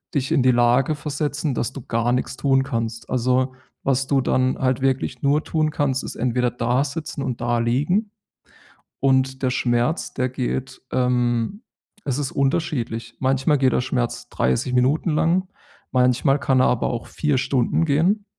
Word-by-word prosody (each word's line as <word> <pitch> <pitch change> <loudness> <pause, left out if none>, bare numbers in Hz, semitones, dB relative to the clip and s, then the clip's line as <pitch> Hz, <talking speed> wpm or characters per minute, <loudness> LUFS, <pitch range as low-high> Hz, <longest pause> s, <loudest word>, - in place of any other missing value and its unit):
dich 135 -2 0
in 135 - +3
die 130 0 +5
Lage 120 +5 +3
versetzen, 150 -1 -2
dass 120 - -2
du 135 - -7
gar 115 +1 0
nichts 125 +1 -2
tun 135 -1 +2
kannst. 115 -4 -4
Also, 130 +1 +1 0.3
was 135 0 +1
du 135 -2 +2
dann 130 0 +1
halt 130 -1 +1
wirklich 130 -1 -1
nur 145 +2 +2
tun 155 -1 0
kannst, 135 -3 0
ist - - -6
entweder 125 +1 0
da 125 +3 0
sitzen 155 0 -5
und 120 -2 -4
da 120 0 +1
liegen-– 150 - 0 0.9
und 130 0 +2
der 130 - +2
Schmerz, 120 +5 0
der 130 -1 -1
geht, 130 0 -3
ähm 125 - 0 0.4
es 135 -3 -1
ist 145 -3 -3
unterschiedlich. 135 -6 -1
Manchmal 135 +2 +2
geht 130 -2 +2
der - - +2
Schmerz 125 -2 -2
30 65 - 0
Minuten 135 +7 +2
lang, 170 +5 +1 0.4
manchmal 125 +2 +3
kann 130 -2 +2
er - - +5
aber 125 - +1
auch 120 -1 -4
4 150 -3 -1
Stunden 130 +5 +1
gehen. 175 +8 +2
130 Hz, 165 wpm, -22 LUFS, 125-145 Hz, 0.9 s, die